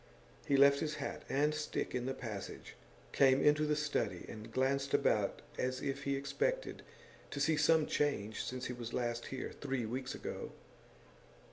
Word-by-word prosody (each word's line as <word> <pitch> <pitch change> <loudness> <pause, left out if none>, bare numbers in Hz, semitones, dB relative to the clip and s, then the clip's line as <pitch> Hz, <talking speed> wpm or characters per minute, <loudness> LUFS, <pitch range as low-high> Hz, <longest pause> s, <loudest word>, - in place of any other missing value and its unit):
He 140 - +4
left 140 0 +7
his 155 -1 -1
hat - - -4
and 145 +3 +2
stick 155 0 -2
in 125 0 -1
the 135 - -2
passage, 105 -5 -6 0.4
came 135 -1 +5
into 150 +1 +4
the 150 - +2
study, 145 - -1
and 110 +1 -8
glanced 135 +3 +1
about - - +1 0.2
as 130 0 0
if 140 +1 -3
he 140 0 +1
expected - - -1 0.5
to 140 - -5
see 155 +3 +3
some 155 +1 +4
change 110 -8 0
since 125 0 -4
he 125 - -3
was 120 -2 -6
last 120 -1 -1
here, 130 - -4
three 135 -4 -3
weeks 130 +3 -3
ago. - - -6
135 Hz, 165 wpm, -35 LUFS, 125-150 Hz, 0.5 s, left